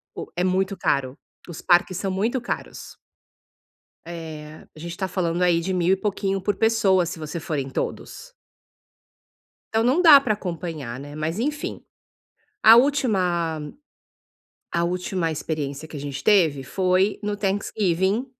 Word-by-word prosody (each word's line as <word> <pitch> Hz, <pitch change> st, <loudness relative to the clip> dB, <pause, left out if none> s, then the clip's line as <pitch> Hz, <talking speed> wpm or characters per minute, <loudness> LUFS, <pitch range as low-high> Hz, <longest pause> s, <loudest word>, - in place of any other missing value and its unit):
O -, -, -6 dB
é 180 Hz, -, 0 dB
muito 190 Hz, +1 st, 0 dB
caro, 135 Hz, +1 st, -1 dB, 0.3 s
os 170 Hz, -, -7 dB
parques 175 Hz, 0 st, +3 dB
são 195 Hz, -1 st, -2 dB
muito 225 Hz, +7 st, 0 dB
caros. 240 Hz, -, -6 dB, 1.1 s
Eh, 155 Hz, -2 st, -9 dB
a -, -, -13 dB
gente 170 Hz, +1 st, -7 dB
tá 190 Hz, -, -2 dB
falando 175 Hz, -1 st, -1 dB
aí 170 Hz, -2 st, +3 dB
de 190 Hz, +2 st, -2 dB
mil 180 Hz, +1 st, +2 dB
e -, -, +4 dB
pouquinho 195 Hz, -1 st, -2 dB
por 205 Hz, +1 st, 0 dB
pessoa, 205 Hz, -5 st, +3 dB
se 165 Hz, -, -5 dB
você 155 Hz, +1 st, -5 dB
for 155 Hz, -1 st, -3 dB
em 135 Hz, -1 st, -3 dB
todos. -, -, -5 dB, 1.4 s
Então 225 Hz, -, +3 dB
não 265 Hz, +9 st, +3 dB
dá 290 Hz, -4 st, +9 dB
para 220 Hz, -6 st, +1 dB
acompanhar, 165 Hz, -, -5 dB
né, 145 Hz, +1 st, -9 dB
mas 160 Hz, +6 st, -3 dB
enfim, 295 Hz, +4 st, -3 dB, 0.8 s
a 225 Hz, +1 st, +9 dB
última 180 Hz, -, +1 dB, 1.0 s
a 170 Hz, 0 st, +1 dB
última 180 Hz, -1 st, -1 dB
experiência 150 Hz, -1 st, -4 dB
que 155 Hz, -, -11 dB
a -, -, -5 dB
gente 140 Hz, -1 st, -6 dB
teve 160 Hz, -10 st, +3 dB
foi 185 Hz, +6 st, +1 dB
no 205 Hz, 0 st, -3 dB
Thanksgiving, 195 Hz, +2 st, 0 dB
180 Hz, 150 wpm, -23 LUFS, 160-205 Hz, 1.4 s, dá